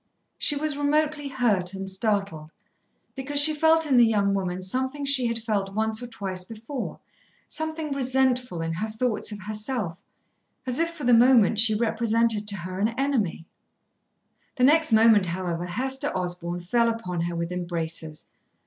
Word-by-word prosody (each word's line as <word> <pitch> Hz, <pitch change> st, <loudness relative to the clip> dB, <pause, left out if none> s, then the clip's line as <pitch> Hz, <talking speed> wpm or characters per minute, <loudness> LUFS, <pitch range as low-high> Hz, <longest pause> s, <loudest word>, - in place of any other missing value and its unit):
She 295 Hz, -, +3 dB
was 300 Hz, 0 st, -1 dB
remotely 300 Hz, 0 st, 0 dB
hurt 210 Hz, -9 st, 0 dB
and 195 Hz, 0 st, -5 dB
startled, 195 Hz, -5 st, -2 dB, 0.6 s
because 275 Hz, +2 st, -1 dB
she 310 Hz, +2 st, +8 dB
felt 320 Hz, +1 st, +3 dB
in 270 Hz, -4 st, +2 dB
the 240 Hz, -, +7 dB
young 200 Hz, -3 st, +1 dB
woman 185 Hz, -2 st, -3 dB
something 260 Hz, +8 st, -2 dB
she 270 Hz, -3 st, +3 dB
had 230 Hz, 0 st, -1 dB
felt 205 Hz, -4 st, -3 dB
once 220 Hz, +1 st, -1 dB
or 245 Hz, -, -6 dB
twice 190 Hz, -5 st, -5 dB
before, 230 Hz, +6 st, -7 dB, 0.5 s
something 315 Hz, -1 st, -4 dB
resentful 255 Hz, -7 st, 0 dB
in 165 Hz, 0 st, -3 dB
her 215 Hz, +7 st, -3 dB
thoughts 220 Hz, 0 st, -1 dB
of 205 Hz, -1 st, -7 dB
herself, 210 Hz, -3 st, -3 dB, 0.6 s
as 255 Hz, +1 st, -2 dB
if 335 Hz, 0 st, +1 dB
for 335 Hz, -3 st, -10 dB
the 245 Hz, -1 st, +4 dB
moment 230 Hz, -3 st, +5 dB
she 220 Hz, -1 st, +4 dB
represented 225 Hz, -1 st, 0 dB
to 205 Hz, -1 st, -1 dB
her 185 Hz, +2 st, -6 dB
an 220 Hz, +3 st, 0 dB
enemy. 245 Hz, -12 st, -1 dB, 1.1 s
The 250 Hz, -, -1 dB
next 310 Hz, +2 st, +5 dB
moment, 220 Hz, -3 st, +5 dB
however, 175 Hz, 0 st, -3 dB
Hester 260 Hz, +8 st, -3 dB
Osborn 175 Hz, -1 st, -4 dB
fell 230 Hz, +6 st, +1 dB
upon 180 Hz, -7 st, -3 dB
her 170 Hz, 0 st, -3 dB
with 170 Hz, +1 st, -3 dB
embraces. 165 Hz, -3 st, -4 dB
220 Hz, 160 wpm, -25 LUFS, 185-260 Hz, 1.1 s, she